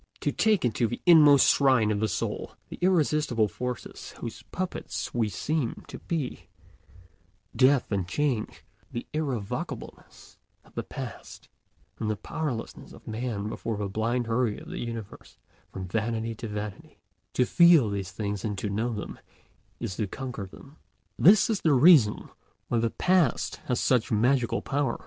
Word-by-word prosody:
To - - 0
take 215 - +2
into 115 0 +1
the 120 - -5
inmost 150 -5 +7
shrine 130 -6 +4
of 105 - 0
the 110 - +1
soul - - -3
the - - -9
irresistible 150 - +2
forces 125 +6 -6
whose - - -6
puppets 185 0 -4
we 115 -3 +1
seem 140 - -2
to - - -8
be—Death 130 - -3
and 95 -3 -1
change, 130 +1 -2 0.3
the 120 - -5
irrevocableness 135 -10 -5 0.3
of - - -22
the - - -2
past, - - -9 0.5
and 110 - -2
the 110 - 0
powerlessness 130 0 -5
of - - -16
man 110 -2 -3
before 110 0 -4
the 100 -1 -2
blind 115 +5 -1
hurry 115 -1 0
of - - -11
the - - -5
universe 115 -3 -7 0.3
from 95 -1 -6
vanity 115 +3 -2
to 115 +1 -7
vanity—to 105 +4 -5
feel 170 -4 +6
these 100 -2 -3
things 100 0 -4
and 105 -3 -3
know 110 +4 -1
them 105 - -6 0.6
is 95 - -4
to 105 - -1
conquer 125 -3 -6
them. 140 +10 -15 0.4
This 195 +5 +7
is 220 -3 -1
the 155 - +3
reason 135 -6 +6 0.4
why 120 - +1
the 115 0 +1
Past 180 -1 +1
has 125 - 0
such 125 -4 +2
magical 120 +3 +2
power. 140 -3 -1
120 Hz, 150 wpm, -27 LUFS, 105-140 Hz, 0.6 s, inmost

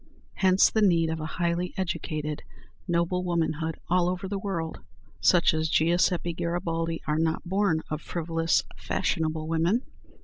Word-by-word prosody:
Hence 190 0 +5
the 220 - +1
need 170 -5 +3
of 160 - -3
a 155 - -4
highly 175 0 -1
educated, 155 -5 -3 0.5
noble 175 +1 +1
womanhood 160 -2 -1
all 180 0 +2
over 185 +1 -3
the 200 +1 -3
world. 170 -5 -3 0.4
Such 175 -2 +4
as 160 0 0
Giuseppe 175 +2 +2
Garibaldi 165 -1 -2
are 150 +1 0
not 160 0 0
born 190 -4 +1
of 155 0 -2
frivolous, 165 -1 0
fashionable 155 -1 -1
women. 165 +9 +1
170 Hz, 140 wpm, -27 LUFS, 160-180 Hz, 0.5 s, Hence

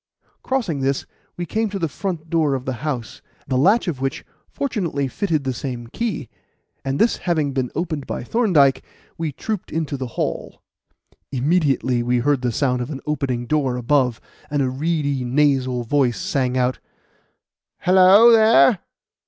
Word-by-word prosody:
Crossing 235 - -1
this, 135 0 -1 0.3
we 175 - -3
came 220 +6 -1
to 200 - -4
the 170 -3 -1
front 165 +1 -5
door 155 -4 +1
of 130 -1 -5
the 130 - -2
house, 130 -8 -4 0.3
the 130 - -1
latch 195 - +3
of 145 -7 -3
which 135 -1 -3 0.2
fortunately 170 - -2
fitted 160 0 -1
the 130 -1 -1
same 125 -1 -5
key; 215 - -3 0.6
and 135 0 -2
this 225 - +2
having 155 -6 -1
been 130 -2 -1
opened 155 -5 -3
by - - -4
Thorndyke, 150 - +3 0.4
we 160 -2 -2
trooped 210 +7 -5
into 155 -3 -2
the 130 -1 -4
hall. - - -3 0.7
Immediately 135 -3 +1
we 120 +1 +1
heard 135 +2 +1
the 125 -1 0
sound 125 +1 0
of 120 - -4
an 140 -3 -6
opening 135 -5 -2
door 135 -2 0
above, 125 -1 +1 0.3
and 145 -1 0
a 130 - -1
reedy, 145 -1 -1
nasal 130 -1 +1
voice 125 -1 +1
sang 130 -2 -1
out: 125 0 0 1.0
"Hello, 190 +5 +7
there! 225 -1 +6
140 Hz, 160 wpm, -21 LUFS, 130-170 Hz, 1.0 s, Hello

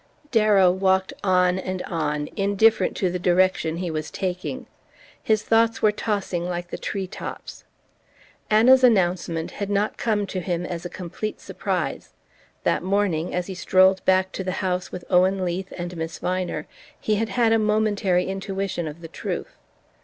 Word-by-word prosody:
Darrow 210 -5 +5
walked 190 0 +1
on 180 -1 +3
and 185 -1 -4
on, 150 -3 -2
indifferent 205 +2 +2
to 185 -2 0
the 180 - -3
direction 175 -2 +2
he 175 -1 -3
was 155 -1 -3
taking. 185 -2 -4 0.6
His 215 -1 +1
thoughts 225 0 +2
were 215 - +6
tossing 200 -5 -2
like 175 0 -4
the - - -3
tree 195 -2 -3
tops. 185 - -8 0.8
Anna's 250 +5 +6
announcement 175 -7 +2
had 200 -1 -4
not 205 +1 0
come 210 -3 0
to 190 -1 -4
him 175 -1 -2
as 175 -1 -5
a - - -3
complete 185 +4 -5
surprise: - - -3 0.5
that - - +1
morning, 185 -4 0
as 180 0 -1
he 190 - -6
strolled 185 +1 +3
back 190 0 +3
to 190 - -4
the 185 0 -2
house 180 0 -1
with 180 - -7
Owen 185 +1 +3
Leath 180 +2 -3
and 175 0 -5
Miss 160 0 -4
Viner, 180 -4 -2 0.3
he 215 -1 0
had 225 +1 -1
had 230 -2 +2
a 225 - +4
momentary 210 -4 +1
intuition 195 -2 -3
of 155 +2 -8
the 165 - -7
truth. - - -5
185 Hz, 165 wpm, -24 LUFS, 175-205 Hz, 0.8 s, were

